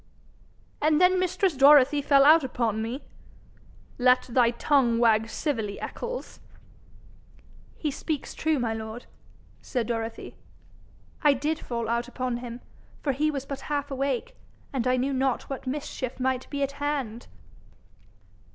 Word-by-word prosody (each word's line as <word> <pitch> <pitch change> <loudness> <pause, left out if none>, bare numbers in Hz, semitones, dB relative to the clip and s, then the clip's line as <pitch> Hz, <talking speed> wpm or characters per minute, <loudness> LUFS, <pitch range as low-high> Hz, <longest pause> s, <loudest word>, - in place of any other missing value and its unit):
'And 305 0 +3
then 365 +1 +4
mistress 370 0 +1
Dorothy 285 +1 +6
fell 280 -1 +5
out 315 +1 +7
upon 230 -4 -1
me 235 +5 -4 0.5
' - - -28
'Let 250 0 +4
thy 240 -1 +4
tongue 240 -1 +2
wag 225 -1 +3
civilly, 225 -10 -3
Eccles.' - - -6 1.4
'He 300 - -2
speaks 300 +1 -4
true, 315 -1 0
my 235 -3 -1
lord,' 220 +2 -7 0.6
said 245 -3 -2
Dorothy. 225 0 -4 0.9
'I 295 -2 +5
did 300 +4 -1
fall 235 -2 -4
out 235 +1 -1
upon 250 -1 -3
him, 240 0 -8 0.4
for 285 - +1
he 295 +4 +1
was 275 -3 -3
but 275 -1 -5
half 285 -1 -2
awake, 275 - -2 0.4
and 255 -2 -1
I 255 0 +3
knew 270 +2 0
not 265 -1 0
what 270 -1 -6
mischief 260 -2 -4
might 260 0 -1
be 285 -1 -2
at 275 - -1
hand.' 270 -6 -3
265 Hz, 140 wpm, -26 LUFS, 235-290 Hz, 1.4 s, out